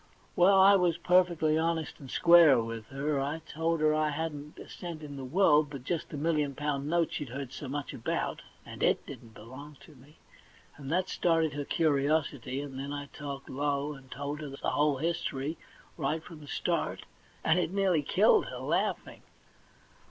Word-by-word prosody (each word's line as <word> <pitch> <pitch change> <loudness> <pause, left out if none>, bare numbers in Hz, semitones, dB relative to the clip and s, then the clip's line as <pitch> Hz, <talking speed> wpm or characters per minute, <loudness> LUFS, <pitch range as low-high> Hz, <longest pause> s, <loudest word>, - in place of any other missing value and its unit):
Well, 190 +2 +5
I 195 +1 +8
was 175 -3 +1
perfectly 170 -3 +3
honest 165 -1 -2
and 135 - -11
square 170 -3 +6
with 115 -1 -5
her; 140 +2 -2
told 165 +1 -1
her 155 0 +4
I 155 0 +1
hadn't 150 -1 -5
a - - -10
cent 170 -3 -8
in 145 -1 -8
the 135 - -7
world 150 0 +3
but 140 -4 -8
just 165 +3 -3
the 150 - -6
million 150 -2 0
pound 145 -1 -2
note 170 0 +1
she'd 145 -4 -4
heard 135 +1 -6
so 145 - -7
much 145 +2 -4
talk - - -9
about, - - -2 0.2
and - - -10
it - - +2
didn't 110 -2 -11
belong 135 +6 -11
to 160 - -15
me; 140 +3 -19 0.6
and 140 -1 -8
that 180 +2 +1
started 165 -4 +1
her 145 0 -4
curiosity, 140 -4 0
and 135 -2 -7
then 140 +1 -5
I 145 -1 -5
talked 140 -2 -7
low, 145 +1 -1
and 135 -2 -14
told 145 +3 -5
her 150 - -6
the 135 - -9
whole 145 -1 +2
history 155 -1 -2 0.4
right 155 +1 -1
from 165 -2 -11
the 145 - -13
start, - - -2 0.4
and 175 - +3
it 175 - 0
nearly 190 -5 +2
killed 210 - +4
her, - - -6
laughing. - - -2
150 Hz, 185 wpm, -30 LUFS, 140-165 Hz, 0.6 s, I